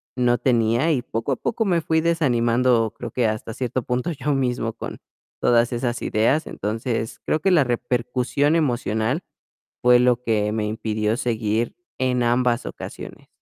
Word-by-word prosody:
no 120 -1 +2
tenía 120 +4 +2
y 130 -6 +1
poco 115 +3 -3
a - - +2
poco 225 -1 -1
me 175 -4 +2
fui 160 0 +1
desanimando, 120 -7 +2
creo 120 - -6
que 125 0 0
hasta 110 +1 -3
cierto 125 0 -2
punto 125 +8 -1
yo 145 -1 -1
mismo 125 -4 -1
con - - -7 0.4
todas 120 0 +3
esas 120 0 -2
ideas. 125 +9 +2
Entonces, 115 +2 -3
creo 155 - +1
que 195 - +1
la 165 -5 +5
repercusión 125 +4 0
emocional 125 - 0 0.6
fue 125 0 +7
lo 125 -1 +3
que 105 -2 +1
me 105 -1 -1
impidió 110 0 -1
seguir 115 -1 -1 0.2
en 125 -1 +1
ambas 120 0 +1
ocasiones. - - -9
120 Hz, 155 wpm, -23 LUFS, 115-130 Hz, 0.6 s, fue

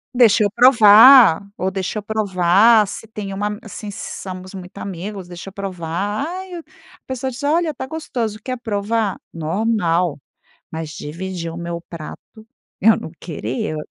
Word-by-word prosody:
Deixa 230 -3 +5
eu 205 - +1
provar 235 -3 +8 0.2
ou 190 +1 -1
deixa 190 +2 -3
eu 205 - -10
provar 210 +1 +4
se 215 +3 -8
tem 205 -3 -6
uma 205 +1 -3
assim 215 -1 -8
se 220 +2 -7
somos 185 0 -8
muito 185 0 -10
amigos, 195 +1 -6
deixa 175 +1 -9
eu 195 - -18
provar. 195 - -3
Ai, 370 +1 -7
eu 340 - -5
A - - -19
pessoa 260 0 -3
diz: 245 - -9
"Olha, 320 +2 +1
tá 265 - -6
gostoso, 245 -9 -4
quer 255 -1 -4
provar?". 220 -2 -1 0.2
Normal. 170 -1 0 0.5
Mas 160 -1 -5
dividir 170 +4 -6
o 165 - -9
meu 170 0 -5
prato, 175 +7 -10 0.3
eu 220 +1 +5
não - - -7
queria. 145 -1 -4
205 Hz, 160 wpm, -20 LUFS, 180-230 Hz, 0.5 s, provar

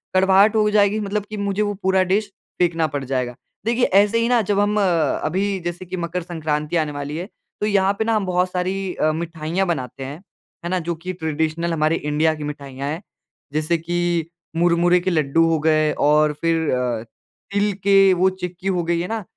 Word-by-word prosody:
कड़वाहट 195 +3 +5
हो 210 -1 +3
जाएगी 210 0 +3
मतलब 205 0 -2
कि 215 - -6
मुझे 200 0 -1
वो 205 -1 0
पूरा 190 0 +3
डिश 205 0 0 0.3
फेंकना 165 -2 +2
पड़ 140 - -4
जाएगा। 125 -2 -2 0.3
देखिए 235 +2 +2
ऐसे 205 +4 +3
ही 230 - +1
ना 245 -2 +4
जब 205 -1 0
हम 205 +1 +2
अ, - - +3 0.4
अभी 190 +5 0
जैसे 175 +1 -4
कि 185 +1 -5
मकर 175 +1 -3
संक्रांति 155 -2 -2
आने 155 -2 0
वाली 145 +1 -5
है, 175 +3 -5 0.3
तो - - +1
यहाँ 200 -1 +3
पे - - +2
ना 225 - +1
हम 210 -2 0
बहुत 180 0 +1
सारी 185 +1 -2
अ, 155 - +1
मिठाइयाँ 165 +2 -2
बनाते 135 -5 -3
हैं। 140 +4 -7 0.5
है - - -2
ना, 185 - +1
जो 170 0 -3
कि 180 +3 -6
ट्रेडिशनल 160 0 -2
हमारे 155 0 +2
इंडिया 150 +1 +1
की 150 - -7
मिठाइयाँ 140 -2 -6
हैं। 160 +4 -4 0.5
जैसे 155 +3 +1
कि 170 0 -1 0.3
मुरमुरे 175 +1 +3
के 180 - -1
लड्डू 155 -2 +2
हो 165 - +2
गए 155 0 +2 0.2
और 150 0 +4
फिर 165 -1 +1
अ, 125 -3 -1 0.5
तिल 205 0 +1
के 195 -1 +6
वो 185 +1 +3
चिक्की 180 0 -6
हो 180 -3 +1
गई 170 0 0
है 175 - -2
ना? 220 -1 -3
175 Hz, 205 wpm, -21 LUFS, 155-195 Hz, 0.5 s, के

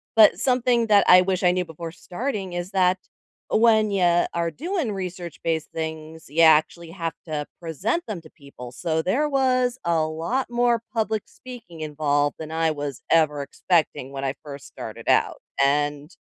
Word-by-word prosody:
but 220 -2 +6
something 245 -2 +2
that 205 -2 +5
I 180 0 +8
wish 185 0 -1
I 180 - +5
knew 180 0 -1
before 165 0 -8
starting 190 +1 -5
is 175 +2 -4
that 185 -1 +3 0.5
when 220 -2 +4
ya 175 -3 +3
are 170 0 0
doing 330 - -2
research-based 175 -4 -4
things, 160 0 -6
you 155 +4 +1
actually 160 +1 +4
have 165 -2 -4
to 150 -3 -3 0.2
present 180 - -2
them 205 -6 -5
to 155 - -15
people, 140 -5 -12
so 160 +5 -2
there 280 +12 +1
was 255 -2 +1
a 170 -1 +2
lot 165 +13 -2
more 240 -1 +2
public 220 -2 -1
speaking 235 -11 -11
involved 145 -1 0
than 160 0 -7
I 160 0 +1
was 145 -3 -5
ever 150 -3 +3
expecting 155 -3 0
when 135 0 -5
I 135 - -1
first 140 -2 -9
started - - -9
out, - - +3 0.3
and 145 +1 0
170 Hz, 165 wpm, -24 LUFS, 155-215 Hz, 0.5 s, I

